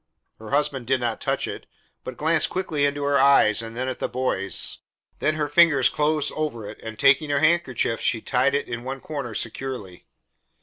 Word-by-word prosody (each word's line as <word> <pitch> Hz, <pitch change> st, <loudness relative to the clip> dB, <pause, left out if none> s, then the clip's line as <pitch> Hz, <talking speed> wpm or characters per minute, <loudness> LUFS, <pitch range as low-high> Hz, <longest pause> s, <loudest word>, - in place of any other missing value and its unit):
Her 110 Hz, -1 st, -10 dB
husband 140 Hz, -4 st, 0 dB
did 130 Hz, 0 st, +2 dB
not 120 Hz, -2 st, -2 dB
touch -, -, -1 dB
it, -, -, -7 dB, 0.4 s
but 130 Hz, -, -7 dB
glanced 160 Hz, 0 st, +2 dB
quickly 155 Hz, -6 st, -1 dB
into 145 Hz, 0 st, -3 dB
her 140 Hz, 0 st, +2 dB
eyes 130 Hz, -6 st, +5 dB
and 115 Hz, 0 st, -8 dB
then 130 Hz, +1 st, -2 dB
at 130 Hz, -, -4 dB
the -, -, -2 dB
boys. 100 Hz, -8 st, -1 dB, 0.4 s
Then 155 Hz, +1 st, +1 dB
her 150 Hz, -1 st, -1 dB
fingers 150 Hz, -3 st, +5 dB
closed 150 Hz, 0 st, 0 dB
over 140 Hz, -8 st, -3 dB
it, 105 Hz, -, -10 dB
and 110 Hz, -1 st, -8 dB
taking 140 Hz, +5 st, +4 dB
her 145 Hz, -, +1 dB
handkerchief 155 Hz, -7 st, +1 dB
she 115 Hz, -, 0 dB
tied 130 Hz, +5 st, +1 dB
it 140 Hz, -, -1 dB
in 120 Hz, 0 st, -5 dB
one 135 Hz, +1 st, -5 dB
corner 135 Hz, -6 st, -6 dB
securely. 115 Hz, -6 st, -6 dB
135 Hz, 190 wpm, -24 LUFS, 115-150 Hz, 0.4 s, eyes